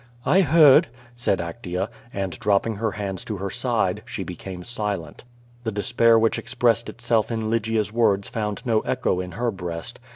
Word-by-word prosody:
"I 190 - +5
heard," 155 -4 +6 0.3
said 120 -5 +1
Actea, 90 +2 -4 0.2
and, 95 -4 -4
dropping 105 +1 +1
her 110 -1 -1
hands 100 -2 -4
to 105 - -4
her 95 0 -4
side, - - 0
she - - -5
became 90 -2 -7
silent. 105 -7 -4 0.4
The 110 - -2
despair 115 +2 +3
which 115 0 +2
expressed 115 -1 +1
itself 115 -2 0
in 110 -1 -2
Lygia's 110 -2 0
words 100 -4 +2
found 105 +1 -4
no 115 -3 +3
echo 125 -6 -1
in 90 -1 -5
her 120 +2 -1
breast. 90 +3 -6
110 Hz, 165 wpm, -24 LUFS, 95-115 Hz, 0.4 s, heard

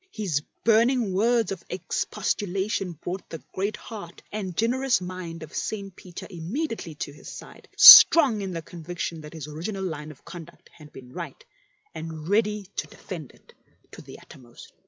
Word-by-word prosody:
His 190 - -2 0.2
burning 230 -1 +3
words 225 +1 +2
of 190 - -6
expostulation 195 0 -2
brought 175 +4 -7
the 165 - -6 0.2
great 200 +3 -2
heart 200 -7 -10
and 190 -5 -5
generous 255 +3 +1
mind 180 -3 -7
of 155 - -12
St. 200 -3 -4
Peter 180 -2 -10
immediately 190 - -5
to 145 - -6
his 150 - -12
side, - - -12
strong 270 -11 +10
in 195 -1 -4
the 165 -2 -5
conviction 170 -1 -6
that 150 +1 -11
his 155 -3 -7
original 180 +6 -5
line 155 -4 -5
of 155 - -15
conduct 170 -1 -12
had 150 -2 -15
been 125 -1 -13
right, - - -8 0.5
and 160 -1 -7
ready 210 0 +1
to - - -2
defend 160 -8 -9
it - - -22 0.4
to - - -11
the - - -12
uttermost. 120 -3 -15
185 Hz, 160 wpm, -25 LUFS, 160-210 Hz, 0.5 s, strong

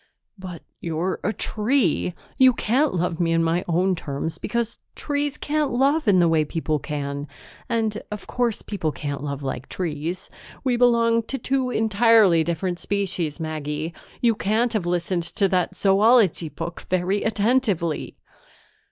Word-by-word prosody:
"But 185 -4 -9 0.2
you're 170 +3 -2
a 205 - +1
tree! 215 - +1 0.2
You 260 -1 +7
can't 255 +3 +1
love 175 -1 -1
me 165 -1 +2
in 165 0 +3
my 165 +2 +1
own 180 +3 +2
terms, 160 -1 -4
because 235 -1 -2 0.2
trees 290 0 -2
can't 300 -1 0
love 275 +4 +2
in 200 -2 +5
the 175 -1 +5
way 160 -1 +3
people 155 0 -2
can, 140 0 -4 0.4
and, 220 -2 0
of 210 -1 -6
course, 240 -3 -1
people 180 -7 -2
can't 145 -2 -5
love 140 -1 -4
like 130 -1 -4
trees. 170 +2 -3 0.4
We 255 -3 +2
belong 235 -1 +4
to 270 - -3
two 260 +1 0
entirely 220 -6 +4
different 175 +2 -2
species, 185 -6 -2
Maggie. 155 0 -4 0.3
You 235 -2 +4
can't 220 +3 0
have 200 -6 -1
listened 175 0 0
to 195 +4 0
that 185 0 0
zoology 200 -3 +4
book 170 +2 -7
very 185 +2 +1
attentively." 210 - 0
185 Hz, 150 wpm, -23 LUFS, 165-230 Hz, 0.4 s, You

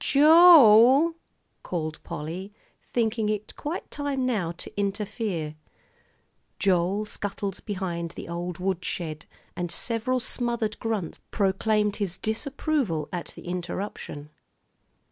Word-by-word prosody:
"Jo 320 +5 +8 0.6
el!" - - -33 0.5
called 155 -3 -4
Polly, 175 +7 -6 0.4
thinking 225 -2 0
it 210 0 -3
quite 310 +5 -5
time 285 -3 -2
now 205 -10 0
to 170 - -10
interfere. 200 -5 -2 1.0
Joel 190 +2 +1
scuttled 200 -2 -5
behind 180 -5 -3
the - - -7
old 175 0 -4
woodshed, 175 -4 -3 0.3
and 175 -1 -3
several 230 +6 0
smothered 235 -3 -2
grunts 215 -7 -3
proclaimed 210 +1 +1
his 195 -4 -3
disapproval 235 - -1
at 175 -1 -3
the - - -11
interruption. 175 -4 -5
200 Hz, 105 wpm, -26 LUFS, 175-230 Hz, 1.0 s, Jo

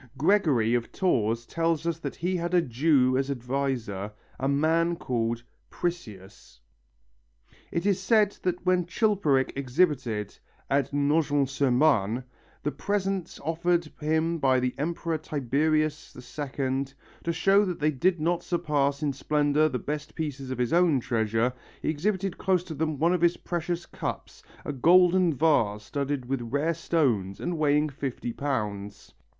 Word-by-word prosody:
Gregory 145 - +3
of 120 -1 -1
Tours 115 - 0
tells 165 +1 -1
us 170 -1 -1
that 140 -5 -5
he 180 +3 -1
had 175 +1 -1
a 175 - +5
Jew 130 0 +2
as 135 0 -1
adviser, 125 -6 -2 0.3
a 135 - 0
man 160 +4 +2
called 120 -6 -2 0.3
Priseus. 105 - -6 1.1
It 170 +2 -2
is 200 -2 +2
said 210 0 +3
that 180 0 -2
when 180 -1 +2
Chilperic 180 - +1
exhibited 130 - 0 0.4
at 140 0 +1
Nogent 145 -1 +2
sur 140 0 +1
Marne 125 -4 +2 0.4
the 150 - 0
presents 195 -2 -2
offered 165 +1 0
him 160 +2 0
by 130 -2 +3
the 125 0 -1
Emperor 165 +1 -2
Tiberius 155 +2 -1
II, 135 0 -3 0.4
to 170 - 0
show 195 +5 +4
that 180 -4 -3
they 150 +1 +2
did 175 +5 +1
not 170 +2 0
surpass 145 -4 0
in 145 -2 0
splendour 150 +2 +2
the 125 - -2
best 150 +3 -5
pieces 140 -4 -4
of 130 - -3
his 125 +2 0
own 170 -5 +4
treasure, 115 0 0 0.3
he - - -2
exhibited 190 +4 -1
close 185 -2 +1
to 170 - -7
them 155 0 -2
one 165 +5 +3
of 180 - 0
his 170 0 +3
precious 175 0 -3
cups, - - -6 0.2
a 145 - -3
golden 180 +5 +5
vase 125 -9 +2
studded 140 +3 -3
with 135 0 -2
rare 145 +8 0
stones 130 - 0
and 175 -2 -3
weighing 150 0 +3
fifty 135 -4 -5
pounds. 105 -8 -4
150 Hz, 150 wpm, -27 LUFS, 130-170 Hz, 1.1 s, a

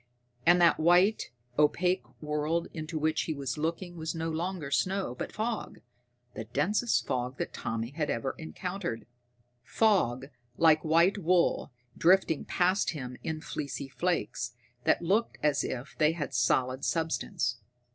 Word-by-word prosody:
And 175 0 +7
that 170 -1 +5
white, 180 +6 +4 0.3
opaque 180 +5 +2 0.2
world 150 +3 -1
into 155 0 -5
which 155 +1 +1
he 160 - -2
was 140 -2 -3
looking 170 +3 -3
was 160 +1 -3
no 165 0 -2
longer 165 -2 -3
snow 185 -1 0
but 125 - -5
fog 220 0 -3 0.5
the 110 - -6
densest 125 - +1
fog 125 +1 -2
that - - -4
Tommy 115 +2 -3
had 150 0 -2
ever 125 +3 -1
encountered. 175 - -5 0.6
Fog 135 - +2 0.3
like 160 -2 +5
white 170 +6 +4
wool, 175 -4 +2 0.2
drifting 175 -3 +3
past 185 +3 +2
him 125 -5 -6
in 155 -1 -4
fleecy 140 -3 -5
flakes 125 -8 -2 0.3
that - - +3
looked 205 +7 +1
as 150 -1 +2
if 130 +3 -5
they 155 0 +4
had 150 -4 -4
solid 130 +2 +1
substance. 165 -4 -1
160 Hz, 140 wpm, -29 LUFS, 135-175 Hz, 0.6 s, And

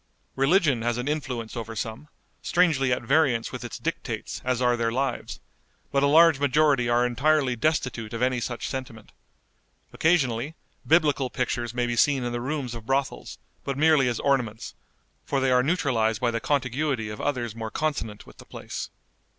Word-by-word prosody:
Religion 140 - +3
has 120 +1 0
an 125 +2 -3
influence 130 -7 -3
over 115 -1 -5
some, 110 +6 -5 0.3
strangely 160 -7 +2
at 125 - 0
variance 130 -3 +2
with - - -6
its - - -6
dictates - - -4
as 125 -1 0
are 125 -1 +3
their 115 -1 0
lives, 130 +1 -2 0.5
but 140 - +2
a 140 - +4
large 160 0 +6
majority 145 -3 +3
are 120 +1 +3
entirely 135 +1 +2
destitute 125 -5 -1
of 115 - -4
any 125 0 +1
such 120 0 -4
sentiment. 125 -5 -7 0.8
Occasionally, 145 -4 +1 0.3
Biblical 150 -4 +3
pictures 120 -2 -2
may 120 -1 +1
be 120 0 -1
seen 135 +2 +3
in 120 - -2
the 120 0 -3
rooms 135 -2 -3
of 115 -1 -9
brothels, 135 - -2 0.3
but 140 -1 -3
merely 155 -3 +4
as 120 -2 -1
ornaments, 125 -6 -1 0.5
for 140 - -1
they 135 -1 +1
are 125 0 +5
neutralized 125 - +1
by 120 -1 +1
the 115 - -2
contiguity 135 -4 -1
of 105 - -6
others 120 -6 -2
more 110 -1 -5
consonant 115 -8 -3
with - - -17
the - - -12
place. - - -7
125 Hz, 175 wpm, -26 LUFS, 120-145 Hz, 0.8 s, large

